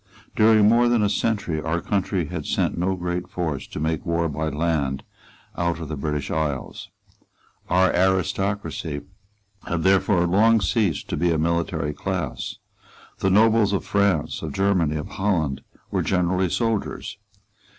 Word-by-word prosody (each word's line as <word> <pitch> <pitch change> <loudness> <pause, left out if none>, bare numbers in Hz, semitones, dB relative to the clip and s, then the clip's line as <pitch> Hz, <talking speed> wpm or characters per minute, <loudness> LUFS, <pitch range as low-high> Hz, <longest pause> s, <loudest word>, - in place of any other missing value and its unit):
During 110 -1 +5
more 120 +2 +4
than 120 -3 +3
a 105 - +2
century 100 -10 -1
our 80 +2 -1
country 95 -2 -1
had 80 -1 -5
sent - - 0
no 90 +2 0
great 90 0 -3
force 80 -6 -3
to - - -7
make 80 0 -1
war 85 -1 0
by 80 +2 -2
land 75 -4 -1 0.5
out 85 -1 -1
of 80 - -6
the 80 - -3
British 75 0 -3
isles. 75 -4 -3 0.8
Our 95 +1 +3
aristocracy 95 -4 0 0.7
had 85 -1 -1
therefore 95 -2 +3
long 110 +6 +4
ceased 95 - 0
to - - -2
be 85 +3 +1
a 80 - +1
military 80 -2 -1
class. 90 -5 -4 0.6
The 95 - +1
nobles 110 +1 +4
of 100 - -1
France, 100 -6 +1
of 75 -3 -5
Germany, 95 -5 +1
of 75 - -4
Holland, 85 -9 -1 0.3
were - - +1
generally 90 0 +1
soldiers. 115 -1 -2
90 Hz, 150 wpm, -23 LUFS, 80-100 Hz, 0.8 s, During